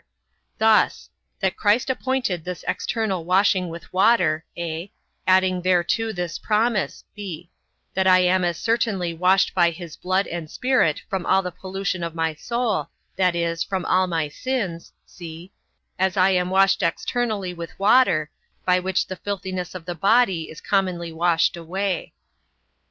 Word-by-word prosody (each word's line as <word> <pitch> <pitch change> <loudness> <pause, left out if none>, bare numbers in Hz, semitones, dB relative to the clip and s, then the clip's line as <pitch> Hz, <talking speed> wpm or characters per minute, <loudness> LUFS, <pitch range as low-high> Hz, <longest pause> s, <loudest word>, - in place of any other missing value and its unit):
Thus: 220 0 +3 0.3
That 190 -1 +1
Christ 215 +5 +2
appointed 260 -9 -1
this 180 0 -6
external 210 -7 -1
washing 185 0 +2
with 165 +2 -10
water, 185 -5 +3
(a) 170 +2 -4 0.4
adding 185 -1 +3
thereto 185 +5 +1
this 175 -4 -4
promise, 215 -1 0
(b) 175 -5 -8 0.4
that 190 0 +1
I 185 0 +6
am 180 0 +3
as 175 -2 0
certainly 210 -6 0
washed 185 +3 +3
by 175 -2 +4
his 170 -1 -9
blood 185 +2 0
and 170 -2 -6
Spirit 250 - +1
from 190 -2 -2
all 190 0 +3
the 180 - -4
pollution 185 0 -4
of 165 -1 -4
my 160 -1 0
soul, 235 +5 -2 0.3
that 180 -2 +2
is, 170 -1 -1
from 190 -3 -3
all 185 0 +2
my 165 -3 -1
sins, 185 - -3
(c) 170 +1 -10 0.5
as 190 +1 +1
I 190 +1 +5
am 180 -1 +1
washed 195 +1 +3
externally 215 -7 -1
with 170 -1 -8
water, 195 - +4 0.3
by 180 0 +4
which 185 0 0
the 185 - -7
filthiness 185 -2 -4
of 175 -3 -7
the 175 - -3
body 195 -2 +2
is 160 - -10
commonly 180 -4 -1
washed 170 +1 +2
away. 185 +3 -3
185 Hz, 150 wpm, -23 LUFS, 170-200 Hz, 0.5 s, I